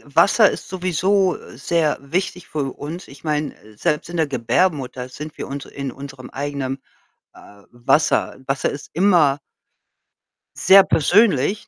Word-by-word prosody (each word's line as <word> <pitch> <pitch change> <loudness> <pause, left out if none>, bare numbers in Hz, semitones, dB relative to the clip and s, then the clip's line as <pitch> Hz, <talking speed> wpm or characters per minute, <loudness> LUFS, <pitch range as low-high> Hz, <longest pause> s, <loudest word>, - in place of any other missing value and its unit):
Wasser 200 +6 +5
ist - - -7
sowieso 185 +1 +1 0.2
sehr 155 +1 0
wichtig 180 +4 -3
für 140 -3 -3
uns. 160 +5 -7
Ich 140 +2 -15
meine, 150 -1 -2
äh, 110 0 -19
selbst 150 +2 -1
in 175 - -5
der 160 -2 +2
Gebärmutter 130 0 -1
sind 150 +3 -8
wir - - -5
uns 140 0 -6
in 140 -2 -6
unserem 135 -1 -10
eigenem, 140 -1 -4 0.6
äh, 100 0 -16
Wasser. 145 +5 +1
Wasser 135 0 0
ist 140 - -9
immer 170 -7 +3 1.2
sehr 195 0 +7
persönlich, 190 - +2
150 Hz, 140 wpm, -21 LUFS, 135-180 Hz, 1.2 s, sehr